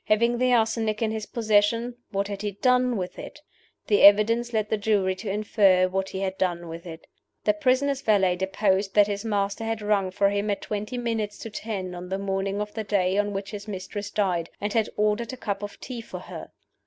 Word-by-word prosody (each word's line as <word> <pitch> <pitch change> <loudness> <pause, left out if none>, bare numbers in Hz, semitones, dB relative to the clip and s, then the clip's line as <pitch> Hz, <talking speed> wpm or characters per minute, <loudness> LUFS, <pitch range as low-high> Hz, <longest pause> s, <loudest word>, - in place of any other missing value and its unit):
Having 235 +3 +2
the 255 0 +3
arsenic 225 -2 +1
in 220 - +1
his 220 -1 -4
possession, 230 +1 +1
what 200 -1 -1
had 200 -1 -5
he 205 -1 -3
done 250 +2 +2
with 180 -1 -5
it? - - -9 0.5
The 205 - +3
evidence 225 +4 +6
led 215 -2 0
the 220 - +2
jury 200 -3 +2
to 205 +1 -5
infer 195 -2 +3
what 190 +1 -2
he 190 - -5
had 190 -1 -3
done 175 -2 -1
with 165 +2 -8
it. 160 -1 -9 0.4
The - - +3
prisoner's 280 -2 +1
valet 195 -7 +3
deposed 190 +1 0
that 205 -1 +7
his 200 0 -3
master 205 -1 -1
had 225 0 -2
rung 205 -2 +1
for 200 +2 +2
him 205 +1 -1
at 200 - -2
twenty 210 +4 -4
minutes 225 -3 -2
to 225 - -7
ten 200 -4 -4
on 180 0 -7
the 190 - -1
morning 195 0 -2
of 210 0 -4
the 220 - -3
day 195 -3 +1
on 205 0 0
which 195 0 -5
his 205 0 -7
mistress 205 +1 -5
died, 180 -5 0
and 205 0 -2
had 225 -2 +1
ordered 210 +4 0
a - - -7
cup 200 -5 -3
of 205 0 -7
tea 245 -3 -6
for - - -8
her. - - -9
205 Hz, 215 wpm, -25 LUFS, 195-225 Hz, 0.5 s, that